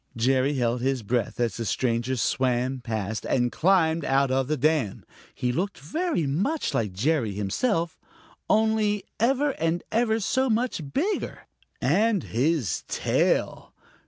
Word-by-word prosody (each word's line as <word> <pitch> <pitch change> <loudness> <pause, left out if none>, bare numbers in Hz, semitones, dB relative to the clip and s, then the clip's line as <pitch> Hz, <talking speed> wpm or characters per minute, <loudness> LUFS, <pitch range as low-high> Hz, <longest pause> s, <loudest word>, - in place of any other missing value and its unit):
Jerry 130 +4 +2
held 120 -1 0
his 130 -2 0
breath 120 +4 -1
as 120 -2 0
the 115 - -3
stranger 120 +2 0
swam 130 +1 0
past 110 -2 -3
and - - 0
then 120 - +1
climbed 165 -3 +2
out 135 -1 +2
on 130 0 +1
the 155 +1 0
dam. 145 -7 0 0.3
He 125 - -1
looked 190 +10 -2
very 315 - -1
much 195 - -1
like 105 -4 0
Jerry 115 - 0
himself, 165 - -1 0.5
only 215 -1 +2 0.2
ever 270 +5 +2
and 165 +2 0
ever 225 0 +2
so 260 +5 +1
much 230 -3 0
bigger. 385 +9 -1 0.4
And 215 -5 +2
his 130 - 0
tail! - - 0
145 Hz, 140 wpm, -26 LUFS, -, 0.5 s, Jerry